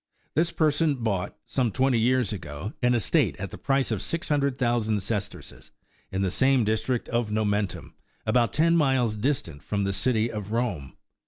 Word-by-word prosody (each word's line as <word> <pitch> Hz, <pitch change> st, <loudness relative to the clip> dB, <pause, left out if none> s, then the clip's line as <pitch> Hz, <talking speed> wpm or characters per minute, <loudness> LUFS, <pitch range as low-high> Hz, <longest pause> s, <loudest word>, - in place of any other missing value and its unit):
This 165 Hz, +2 st, +2 dB
person 155 Hz, -1 st, +2 dB
bought, 110 Hz, -7 st, -2 dB
some 125 Hz, -4 st, 0 dB
twenty 130 Hz, +2 st, +2 dB
years 125 Hz, -2 st, +2 dB
ago, 80 Hz, -, -6 dB
an 125 Hz, 0 st, +3 dB
estate 115 Hz, -, +2 dB
at -, -, -5 dB
the -, -, -8 dB
price 135 Hz, -2 st, +1 dB
of 105 Hz, -4 st, -1 dB
six 165 Hz, 0 st, -3 dB
hundred 140 Hz, -3 st, +1 dB
thousand 115 Hz, -4 st, +1 dB
sesterces 105 Hz, 0 st, -5 dB, 0.4 s
in 95 Hz, +1 st, -1 dB
the 95 Hz, -, 0 dB
same 130 Hz, +2 st, +3 dB
district 110 Hz, +3 st, -1 dB
of 120 Hz, -3 st, -1 dB
Momentum, 105 Hz, -3 st, -1 dB, 0.3 s
about 120 Hz, +2 st, +2 dB
ten 165 Hz, +2 st, +3 dB
miles 130 Hz, -8 st, +2 dB
distant 105 Hz, -, -2 dB
from 100 Hz, -1 st, -2 dB
the 100 Hz, 0 st, 0 dB
City 115 Hz, +1 st, +1 dB
of 105 Hz, -1 st, -6 dB
Rome. 105 Hz, -, -2 dB
115 Hz, 170 wpm, -26 LUFS, 105-130 Hz, 0.4 s, an